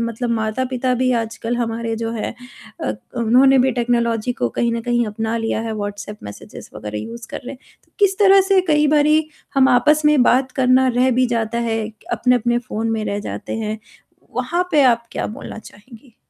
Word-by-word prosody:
मतलब 230 +1 -2
माता-पिता 250 +3 -1
भी 255 +1 +1
आजकल 225 +1 -4
हमारे 230 -1 -2
जो 225 0 -3
हैं 225 0 -4 0.5
अ, 105 - -1
क 105 - -12 0.4
उन्होंने 270 +1 +6
भी 260 +1 +3
टेक्नोलॉजी 235 -1 0
को 120 - -1
कहीं 235 - -1
न 230 - -2
कहीं 240 0 0
अपना 220 +2 -3
लिया 225 -1 -1
है, 225 0 -4
व्हाट्सऐप 205 0 -6
मेसेज 100 - -10
वगैरह 105 0 -6
यूज़ 230 - -8
कर - - -5
रहे - - -6
हैं। - - -17 0.3
तो - - -37
किस 390 -2 +2
तरह 395 -1 +6
से 390 -1 +5
कई 300 -1 +4
बारी 305 +1 +3 0.3
हम 270 -1 +5
आपस 295 +5 +4
में 300 -3 +5
बात 255 +1 +2
करना 260 0 +3
रह 255 +1 +3
भी 255 +1 +2
जाता 235 -1 -1
है, 230 -1 -1
क 220 - -12 0.2
अपने-अपने 240 -1 +2
फ़ोन 225 -1 -3
में 220 -1 -1
रह 200 - -2
जाते - - -6
हैं, 215 -1 -3 0.6
वहाँ 350 +1 0
पे 295 -4 +4
आप 235 -2 +3
क्या - - -2
बोलना - - -8
चाहेंगी? 225 +3 -15
235 Hz, 200 wpm, -20 LUFS, 225-260 Hz, 0.6 s, उन्होंने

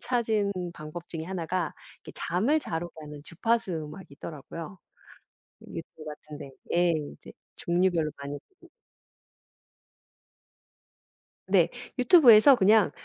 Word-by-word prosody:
찾은 220 -5 0 0.2
방법 155 +3 -9
중에 160 -1 -5
1 180 -2 -4
가 180 -2 -1 0.3
이렇게 - - -10
잠을 230 - +1
잘 165 - -3
오게 175 - -9
하는 150 -1 -9
주파수 225 +2 0
음악이 160 +4 -6
있더라고요. 165 +5 -8 0.9
유튜브 160 -1 -9
같은 150 0 -9
데에. 140 -2 -9 0.2
예 175 0 +4 0.2
이제 - - -14 0.2
종류별로 170 -3 +1
많이 140 +1 -6
보고 380 - -21 2.8
네. - - +4 0.3
유튜브에서 250 -2 +8
그냥 210 -3 +5
175 Hz, 250 characters per minute, -28 LUFS, 155-215 Hz, 2.8 s, 유튜브에서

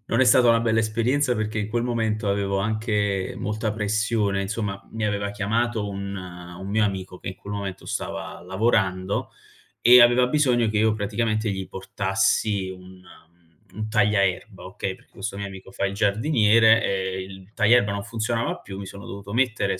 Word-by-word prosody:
non 115 - +1
è - - +6
stata 125 -1 +5
una 115 0 +5
bella 110 -1 +2
esperienza 120 +4 +1
perché, 110 0 -2
in 105 - -3
quel 120 +2 -1
momento, 110 -3 -1
avevo 100 -1 0
anche 105 -2 -1
molta 105 0 -2
pressione. 105 -1 0
Insomma, 100 -1 -3
mi 110 -1 -3
aveva 100 -1 -1
chiamato 110 +1 -1
un 100 0 -5
un 90 0 -9
mio 105 +2 +2
amico 95 -2 -4
che - - -7
in 95 - -6
quel 100 - -8
momento 100 -2 -5
stava - - -5
lavorando 95 -1 0 0.5
e 125 +2 +8
aveva 120 +1 +4
bisogno 125 -4 +2
che 105 - -1
io, 110 0 +3
praticamente, 110 +1 -1
gli 95 -1 -4
portassi 95 +1 0
un 95 0 -12
mhmm, 85 -1 -21 0.3
un 110 0 -3
tagliaerba, 100 -2 +1
okay, 95 0 -4
perché - - -25
questo 100 0 -5
mio 100 0 -4
amico 95 0 -11
fa 100 - -2
il 100 0 -3
giardiniere, 110 +1 +4
e 95 -1 -1
il 95 +1 -12
tagliaerba 105 -1 +4
non 100 0 -4
funzionava 115 +2 -2
più. 95 -1 -9
Mi 100 - -6
sono 100 +1 -10
dovuto 100 +1 -8
mettere 110 -6 +1
105 Hz, 175 wpm, -24 LUFS, 95-110 Hz, 0.5 s, e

